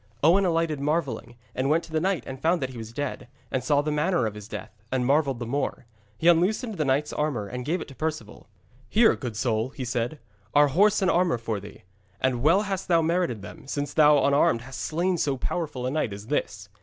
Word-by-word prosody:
Owen 185 +6 +5
alighted 165 -4 +1
marvelling, 140 -4 -2 0.2
and 130 +2 -1
went 165 +3 +2
to 165 - -13
the 160 - +1
knight 185 -6 0
and 130 0 -7
found 170 +3 +2
that 130 -2 -3
he 125 - -10
was 110 0 -7
dead, 140 0 -4 0.2
and 130 - -1
saw 145 +1 +2
the 150 - -1
manner 150 -1 +1
of 110 - -2
his 105 -1 -9
death, 110 -2 -8
and 130 -1 0
marvelled 140 -1 +2
the 120 - -5
more. 130 0 -2 0.3
He 165 - 0
unloosed 200 +7 +3
the 155 -4 -1
knight's 140 +2 +1
armour 145 -9 -1
and 125 +5 -5
gave 165 +4 -1
it - - -6
to 135 - -12
Perceval. 150 -8 -5 0.4
'Here, 225 +1 +5
good 120 -5 -6
soul,' 115 0 0
he 130 -1 -6
said, 120 +4 -2 0.4
'are 145 0 +6
horse 205 +7 +3
and 185 - +3
armour 175 -6 +2
for 115 -2 -3
thee. 100 +1 -12 0.4
And 130 -2 0
well 170 - +4
hast 195 -3 -3
thou 170 -2 +3
merited 160 - 0
them, 140 +7 -11
since 145 +1 -3
thou 150 -2 +5
unarmed 140 -5 +3
hast 135 +2 -8
slain 175 +2 0
so 140 -2 0
powerful 135 -2 -3
a 130 - -1
knight 145 -8 -1
as 100 +1 -8
this.' 100 -7 -2
145 Hz, 225 wpm, -26 LUFS, 125-165 Hz, 0.4 s, are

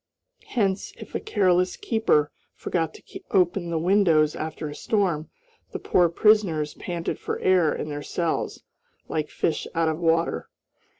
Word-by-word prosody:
Hence, 195 -5 -1
if - - -11
a - - -1
careless 185 - +1
keeper 220 - +1 0.2
forgot 165 -3 -2
to - - -14 0.3
open 180 -2 +2
the 165 - -1
windows 165 -4 +3
after 155 0 -5
a 145 - -6
storm, 175 -5 -1 0.4
the - - -2
poor 175 -2 +3
prisoners 170 -6 +3
panted 170 -2 -4
for - - -3
air 180 -5 +4
in 155 - -4
their 145 0 -4
cells, 165 +2 -2 0.4
like 155 -1 -2
fish 160 - -1
out 165 -1 +2
of 160 0 -2
water. 165 - +1
170 Hz, 145 wpm, -25 LUFS, 155-190 Hz, 0.4 s, air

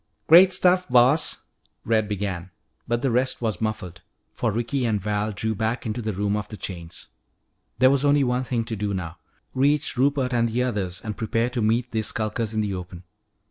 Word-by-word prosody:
"Great 180 +4 +8
stuff, 180 0 +3
Boss 125 +5 +3 0.2
" - - -42
Red 110 -2 +1
began. 100 -3 -4 0.4
But 120 0 -1
the 135 - +1
rest 130 +2 +1
was 110 -6 -2
muffled, 95 -5 -4 0.3
for - - -1
Ricky 120 +5 -2
and 110 -3 +1
Val 105 +2 -2
drew 110 +2 -2
back 110 +3 -2
into 110 +2 -3
the 110 -1 -2
room 100 +1 -1
of 105 -1 -3
the 105 - -9
chains. 85 -4 -7 0.7
There 130 +1 +5
was 140 0 +1
only 145 0 +4
one 125 0 0
thing 120 -3 -2
to 115 - -4
do 100 -1 -2
now 85 -2 -6 0.3
reach 145 +1 +1
Rupert 135 -1 +1
and 115 -1 +2
the 120 +3 0
others 100 -8 -3
and 110 -2 -5
prepare 115 +2 -1
to 125 -2 -2
meet 115 +3 +1
these 110 -2 -1
skulkers 110 0 -2
in 110 - +1
the 105 -2 -2
open. 90 -1 -8
110 Hz, 200 wpm, -24 LUFS, 105-125 Hz, 0.7 s, Great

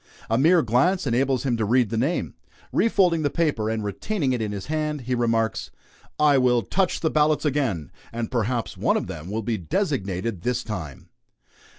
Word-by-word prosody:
A - - +4
mere 165 +3 +5
glance 150 - +2
enables 130 +1 +1
him 125 -4 0
to 110 - 0
read 120 +1 +2
the - - -1
name. 135 +10 -1 0.4
Refolding 185 -8 +3
the 145 - +1
paper, 145 -11 0
and 110 -1 -2
retaining 130 - -1
it 120 - -1
in 105 -1 -2
his 100 -2 -5
hand, 150 -1 -2
he 125 +1 -3
remarks: 115 -2 0 0.5
"I 145 -2 +5
will 125 -2 +3
touch 185 - 0
the 160 - +1
ballots 155 0 +2
again, 130 - -1 0.2
and 115 -1 -4
perhaps 120 -1 -1
one - - +1
of - - -2
them 80 +4 -7
will 110 +2 -3
be 110 0 -1
designated 100 - -2
this 125 +4 -1
time." 80 - -7
125 Hz, 185 wpm, -24 LUFS, 110-150 Hz, 0.5 s, mere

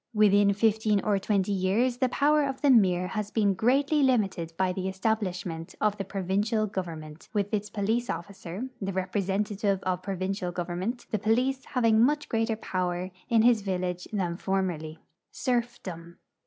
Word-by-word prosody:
Within 205 -1 +5
fifteen 215 -1 +2
or 205 -2 +2
twenty 200 0 0
years 200 +6 +1
the 255 0 +1
power 295 +3 +3
of 270 -1 -3
the 285 - +6
mir 185 -6 +4
has 210 +1 -3
been 205 -3 +2
greatly 275 - +2
limited 205 -11 +1
by 185 -1 +1
the 190 0 -3
establishment 185 -5 -2
of 210 -1 +2
the - - -1
provincial 200 +3 0
govern 180 -6 -4
ment, 155 +1 -12
with 205 +1 0
its 210 0 -1
police 220 +4 -1
officer, 195 +4 -5
the 195 0 -2
representative 195 +2 -1
of 185 -1 -1
provincial 185 -1 -3
government, 180 +7 -3
the 215 - 0
police 250 +6 +1
having 230 -4 +3
much 295 +3 +1
greater 225 0 0
jDower 185 -3 -2 0.2
in 230 -2 +4
his 235 -2 +5
vil 190 -2 -2
lage 180 -1 -3
than 180 -5 -1
formerly. 175 -5 -2 0.4
SERFDOM. 200 -9 -3
200 Hz, 160 wpm, -28 LUFS, 185-225 Hz, 0.4 s, the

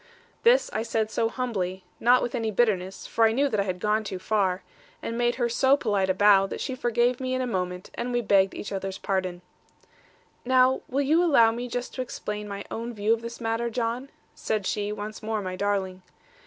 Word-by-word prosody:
This 485 +2 +5
I 215 - 0
said 225 -1 -1
so 225 - +1
humbly, 190 -7 -3 0.2
and - - -12
not 250 +1 +6
with 240 - -3
any 225 -3 -1
bitterness 195 -4 0
for 225 - +2
I 220 - +4
knew 275 +5 +2
that 215 - -1
I - - +3
had 185 -2 -3
gone 210 +2 +1
too 195 -3 -5
far 190 -1 0 0.4
and 230 - -4
made 240 0 +1
her 240 -2 +1
so 265 +4 +3
polite 205 -7 0
a 185 - +2
bow, 195 -1 +5
that - - -6
she 265 - -3
forgave 240 0 +1
me 255 -1 -2
in 255 - -1
a - - 0
moment, 180 -5 -3
and 245 +1 -3
we 240 0 +1
begged 195 -3 +3
each - - -6
other's 195 -1 -4
pardon. 185 -2 -2 1.0
'Now, 255 +1 +4
will 275 +2 +1
you 315 +5 +3
allow 235 -10 +5
me 240 +2 -4
just 245 +1 -4
to 255 - -3
explain 210 -4 -5
my 200 0 -6
own 235 +1 -4
view 210 +2 +2
of 230 - -2
this 235 0 -7
matter, 230 0 -1
John?' 235 +3 -2 0.2
said 215 -3 -2
she, 205 +1 -1
once 210 +1 -6
more 220 0 -2
my 185 -2 -4
darling. 190 -2 -1
220 Hz, 220 wpm, -26 LUFS, 195-245 Hz, 1.0 s, not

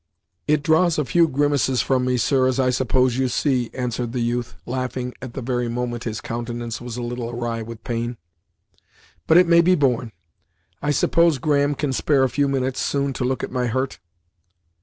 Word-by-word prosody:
"It 150 -1 +2
draws 160 +2 +3
a 150 - 0
few 170 +6 +3
grimaces 140 -4 +1
from 130 +4 +1
me, 125 0 +1
sir, 130 +2 +2
as 130 0 0
I 130 -1 +3
suppose 130 0 +1
you 130 - +2
see," 125 -1 0
answered 120 -2 -3
the 125 - -2
youth, 120 0 -2
laughing 125 0 -3
at 130 -2 -8
the 135 - -4
very 120 -1 -1
moment 120 0 -3
his 110 -2 -4
countenance 120 0 -5
was 120 -1 -6
a 120 - -4
little 120 0 -4
awry 120 -1 -3
with 115 0 -9
pain. 120 0 -3 1.1
"But 160 - +6
it 180 - +7
may 170 0 +6
be 180 +2 +4
borne. 125 -6 +1 0.7
I 145 - -1
suppose 165 +2 +3
Graham 145 +1 +1
can 140 -1 -2
spare 135 +1 +2
a 130 - +2
few 145 +2 +1
minutes, 130 -1 -1
soon, 140 -1 0
to 125 - -3
look 130 0 -1
at - - -4
my 125 -1 -1
hurt." 130 -3 -2
130 Hz, 195 wpm, -22 LUFS, 120-140 Hz, 1.1 s, it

